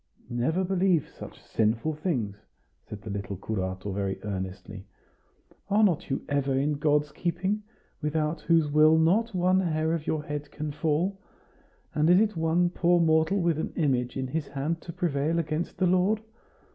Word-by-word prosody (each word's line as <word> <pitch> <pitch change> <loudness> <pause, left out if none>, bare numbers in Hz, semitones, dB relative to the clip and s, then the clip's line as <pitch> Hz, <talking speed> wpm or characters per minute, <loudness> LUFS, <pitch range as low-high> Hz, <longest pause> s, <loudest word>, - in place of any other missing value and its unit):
"Never 140 +10 0
believe 185 -4 +2
such - - -11
sinful 115 +8 0
things!" 130 - -2 0.5
said 105 -1 -8
the 110 - -6
little 100 -1 -4
curato 95 -1 -3
very 95 0 -2
earnestly. 95 0 -6 0.8
"Are 210 +2 +4
not 180 -5 +2
you 135 - -2
ever 140 -1 0
in 140 +3 +1
God's 150 0 +2
keeping, 190 +6 -1 0.4
without 150 +1 -1
whose 165 -3 +2
will 155 +2 +6
not 190 +7 +2
one 185 +1 +3
hair 160 -3 0
of 160 -2 -3
your 155 -1 -1
head 150 -1 -5
can 150 +1 -5
fall? 165 +6 0 0.7
and 155 +2 +2
is 205 +4 +4
one 165 +2 +2
poor 175 0 +3
mortal 160 +4 +3
with 170 -3 +1
an - - -3
image 130 -6 0
in 130 - -1
his 145 +2 -3
hand 150 +4 -3
to 170 - -7
prevail 160 -1 0
against 160 0 -2
the 185 - +2
Lord? 185 +4 +3
155 Hz, 160 wpm, -27 LUFS, 135-175 Hz, 0.8 s, will